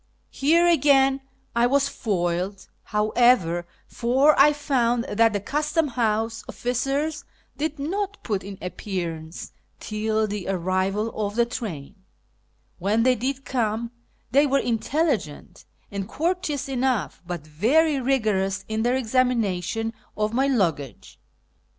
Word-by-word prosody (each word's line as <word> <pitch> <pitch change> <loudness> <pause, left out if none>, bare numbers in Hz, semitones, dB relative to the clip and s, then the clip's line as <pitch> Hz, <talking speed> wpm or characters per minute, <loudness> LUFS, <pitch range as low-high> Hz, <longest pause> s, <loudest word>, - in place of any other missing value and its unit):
Here 330 +5 +3
again 275 -5 +4 0.3
I 235 +1 +4
was 280 +2 +2
foiled, 185 -4 -2 0.2
however, 210 -5 +2 0.2
for 265 +5 +3
I 290 +2 +8
found 245 -5 +1
that 225 -2 +2
the 205 - 0
Custom 300 - 0
House 225 -2 -1
oflicers 275 +5 -2 0.3
did 305 +2 -2
not 390 +8 -3
put 205 -4 -2
in 195 0 -8
appearance 170 -3 -5 0.3
till 215 0 -1
the 205 -3 -4
arrival 190 +4 0
of 205 -1 -3
the 235 0 +3
train, 205 - -6 0.8
AVhen 210 +5 +2
they 255 +1 +5
did 265 +3 -3
come 230 -2 -1 0.4
they 285 +4 +5
were 275 0 +2
intelligent 240 - -1 0.3
and 200 -1 -4
courteous 330 -3 -1
enough, 260 -4 -1
but 175 -4 -5
very 270 - +2
rigorous 215 -7 0
in 220 0 -2
their 245 +2 +2
examination 225 -4 0 0.2
of 215 +1 0
my 265 +3 +2
luggage. 170 - -1
230 Hz, 120 wpm, -24 LUFS, 200-275 Hz, 0.8 s, I